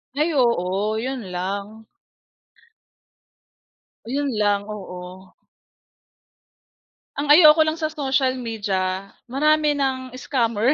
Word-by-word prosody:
Ay, 305 +3 +1
oo, 215 -5 +1
yun 260 +4 -3 0.2
lang. 200 +4 -5 2.2
Yun 280 +4 -2
lang, 205 0 +1
oo. 185 -2 -9 1.8
Ang 290 +1 0
ayoko 310 0 +8
lang 310 +1 -2
sa 310 - 0
social 265 -3 0
media, 195 -5 -3 0.2
marami 300 +3 +2
ng 260 -2 -2
scammer. 235 -2 +1
240 Hz, 90 wpm, -22 LUFS, 200-280 Hz, 2.2 s, ayoko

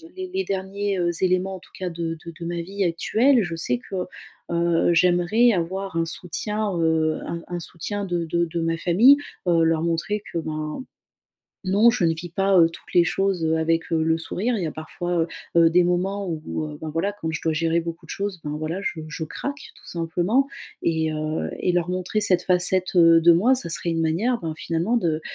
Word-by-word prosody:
les 375 0 -5
les 385 0 0
derniers, 195 +1 -2
heu, 175 -1 +1
éléments, 185 +1 +1
en - - -9
tout - - -20
cas 185 -1 -3
de 165 -1 -4
de 170 - -7
de 170 - -6
ma 170 0 -3
vie 195 +4 -3
actuelle, 225 +10 +3
je 170 -3 -4
sais 125 -7 -1
que, 190 - -9 0.6
heu, 170 0 +2
j'aimerais 180 +7 +4
avoir 190 +1 -3
un 165 - +2
soutien, 200 +4 -3
heu, 160 -1 +1
un 170 - -4
un 175 0 -4
soutien 205 +5 -5
de 175 -2 -2
de 170 +2 0
de 170 +1 -4
ma 165 0 0
famille, 190 +11 +6 0.3
heu, 165 -2 +4
leur 165 -1 +2
montrer 170 +5 -1
que - - -1
ben 155 +6 -4 0.8
non, 200 +5 +5
je 225 -7 +1
ne 165 - +3
vis 170 +2 -7
pas, 195 +2 +2
heu, 165 -1 +6
toutes 165 - -13
les 175 - +6
choses, 190 0 0
heu, 160 0 +2
avec, 165 +1 0
heu, 160 -1 +2
le 160 0 +2
sourire, 210 +8 -2
il 190 - -2
y - - -1
a - - -4
parfois, 160 +3 -6
heu - - -5 0.3
heu, 165 -1 +6
des 175 +2 +4
moments 190 +3 0
où, 160 -1 -4
heu, 150 -1 -8
ben 160 - -5
voilà, 165 +6 -1
quand 160 - -2
je 155 - -4
dois 160 - +1
gérer 165 +1 +1
beaucoup 165 0 -7
de - - -21
choses, 200 -2 -3
ben 150 0 -3
voilà, 155 +4 -3
je 165 -4 -3
je 165 - -5
craque 280 - -6
tout - - -19
simplement, 175 +10 0 0.4
et 160 -1 +1
heu, 155 +1 -2
et 180 - +1
leur 175 0 0
montrer 185 +4 -1
cette 180 -3 +3
facette, 185 +1 +2
heu, 165 -1 +7
de 170 +1 +7
moi, 225 +11 +4
ça 255 - -2
serait 170 +1 -1
une 165 -1 -1
manière, 200 +10 +1
ben 160 -2 -3
finalement 170 +10 -1
de 160 -7 0
170 Hz, 220 wpm, -23 LUFS, 165-195 Hz, 0.8 s, heu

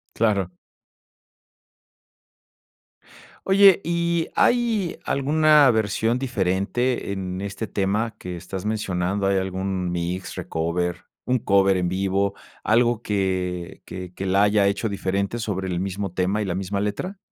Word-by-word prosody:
Claro. 100 -5 +1 3.0
Oye, 195 -1 +6
¿y 170 0 0
hay 230 -7 +2
alguna 150 +1 +4
versión 110 +2 +1
diferente 110 0 -1
en 95 -1 -4
este 100 +3 -4
tema 105 +3 -1
que 90 -1 -6
estás 95 +2 -6
mencionando? 100 -2 -1
¿Hay 95 0 +2
algún 95 -1 -2
mix, 90 +2 -3
recover, 85 +2 -2 0.2
un 125 0 +1
cover 95 -3 +3
en 90 -1 0
vivo, 95 +2 0 0.3
algo 120 +1 +3
que 95 -4 -2
que 90 -1 -7
que 95 - -4
la 95 +2 +3
haya 105 -1 +4
hecho 100 +3 0
diferente 100 +2 -2
sobre 95 -4 -3
el 90 -1 -2
mismo 95 -1 -3
tema 95 +4 0
y - - -2
la 90 - -2
misma 100 +1 -2
letra? 180 - -3
100 Hz, 130 wpm, -23 LUFS, 95-115 Hz, 3.0 s, Oye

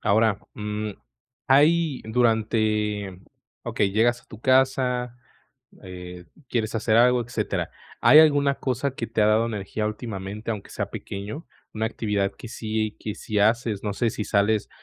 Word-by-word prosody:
ahora, 110 0 +3 0.2
mm, 105 0 -4 0.6
hay 150 +1 +4
durante, 110 -4 0 0.4
okey, 100 -2 0
llegas 120 +3 +2
a - - -29
tu 110 - -12
casa, 130 -2 +2 0.7
eh, 90 -1 -9 0.2
quieres 115 -2 -1
hacer 110 0 +1
algo, 125 0 +5
etcétera. 120 +1 -3 0.3
¿Hay 140 +6 +8
alguna 145 -3 +5
cosa 130 +1 -2
que 115 - -4
te 115 -1 -1
ha - - +5
dado 110 +2 +3
energía 105 0 -3
últimamente, 105 -1 -5
aunque 105 -3 -6
sea - - -4
pequeño? 105 - -7 0.3
¿Una 110 +1 -1
actividad 105 -4 -1
que 120 - -10
si 110 -2 -3
que 105 - -5
si 105 -1 -3
haces, 110 -1 +2
no 105 -1 -2
sé 115 +1 0
si 105 - -4
sales, 105 +1 +1
110 Hz, 150 wpm, -24 LUFS, 105-120 Hz, 0.7 s, Hay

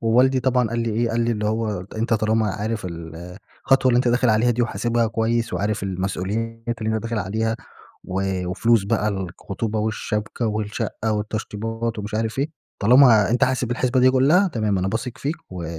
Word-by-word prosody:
ووالدي 125 +3 +3
طبعًا 125 -3 +2
قال 120 +1 -2
لي 115 - -1
إيه؟ 115 +2 0
قال 115 +1 0
لي 120 0 +1
اللي 105 -1 -2
هو: 105 -4 -1
"أنت 115 +1 +1
طالما 110 0 +1
عارف 110 -1 -3
الخطوة 85 - -2
اللي 120 - +3
أنت 125 0 +3
داخل 125 +1 +2
عليها 110 +3 +3
دي 120 +1 +1
وحاسبها 115 +1 0
كويّس، 115 +1 0
وعارف 105 0 -1
المسؤوليات 105 +5 -3
اللي 110 0 -1
أنت - - -4
داخل 115 -1 -2
عليها، 110 +3 -1 0.5
و 95 -1 -2
وفلوس 110 +3 +2
بقى 105 +1 +1
الخطوبة 100 +3 -4
والشبكة 110 +1 -2
والشقّة 110 +1 -2
والتشطيبات 110 +2 -3
ومش 105 +1 -5
عارف 110 +2 -2
إيه، 145 +3 0 0.3
طالما 115 -2 +6
أنت 125 +3 +3
حاسب 125 -2 -1
الحسبة 125 +1 +1
دي 130 +1 +6
كلّها، 150 +10 +4
تمام. 110 - 0
أنا 95 - 0
باثق 115 +4 -4
فيك 150 +4 -2
و 90 -2 -6
110 Hz, 180 wpm, -22 LUFS, 105-120 Hz, 0.5 s, طالما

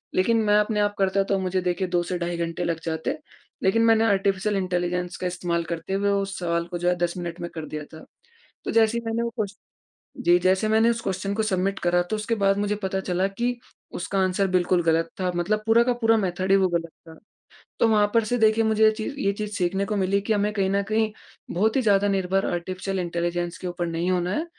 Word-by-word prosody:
लेकिन 230 +5 +3
मैं 210 -1 +3
अपने 210 0 0
आप 205 0 0
करता 195 0 +2
तो 195 - +3
मुझे 185 0 -1
देखिए 180 +1 -1
2 175 -1 +1
से 180 +1 -3
ढाई 170 0 -2
घंटे 170 +1 -3
लग 165 -1 -1
जाते 160 -1 -2 0.5
लेकिन 210 +4 +3
मैंने 225 -1 +5
आर्टिफिशियल 200 0 +1
इंटेलिजेंस 180 -1 -2
का 180 - -2
इस्तेमाल 175 -1 -2
करते 165 +3 -5
हुए 200 +1 +1
उस 195 -1 -1
सवाल 170 -1 -1
को 175 0 -4
जो 175 +1 +1
है 180 - +2
10 175 0 -1
मिनट 175 -1 -5
में 170 - -4
कर 160 -1 -5
दिया 150 0 -5
था। 160 - -11 0.6
तो - - -2
जैसे 225 0 +3
ही - - -10
मैंने 225 +1 -1
वो 235 - -1
क्वेश्चन 205 -2 -3 0.7
जी, 175 +1 +5
जैसे 185 +4 +2
मैंने 220 +2 +4
उस 230 -1 -1
क्वेश्चन 195 0 -2
को 220 - 0
सबमिट 195 -2 0
करा 175 0 +2
तो 215 - 0
उसके 215 +2 -1
बाद 195 0 +3
मुझे 205 0 0
पता 190 0 -1
चला 185 0 0
कि 240 +5 -2 0.4
उसका 190 +2 -3
आंसर 190 +1 +1
बिल्कुल 180 -1 +2
गलत 165 0 +2
था 185 -1 +1
मतलब 210 +5 0
पूरा 225 +1 +5
का 250 - +2
पूरा 225 0 +5
मेथड 185 -1 -2
ही - - +7
वो 190 -1 +3
गलत 170 -1 -2 0.2
था। 160 -1 -13 0.6
तो - - +4
वहाँ 210 -1 +4
पर 230 - +5
से 245 +3 0
देखिए 220 0 +4
मुझे 220 0 +2
ये 215 - +6
ची 215 0 -5 0.2
ये 200 - +3
चीज़ 210 +1 -5
सीखने 190 +1 0
को 210 - -2
मिली 195 +1 +1
कि 210 +2 0
हमें 205 0 +1
कहीं 195 -2 0
न 200 0 +2
कहीं 220 0 +1 0.4
बहुत 215 +5 +1
ही - - +3
ज़्यादा 205 -3 +3
निर्भर 195 0 0
आर्टिफिशियल 185 +2 -3
इंटेलिजेंस 175 0 -2
के 185 - -5
ऊपर 175 -1 -3
नहीं 170 +2 -1
होना 180 0 0
है 315 - -1
190 Hz, 235 wpm, -24 LUFS, 175-210 Hz, 0.7 s, ही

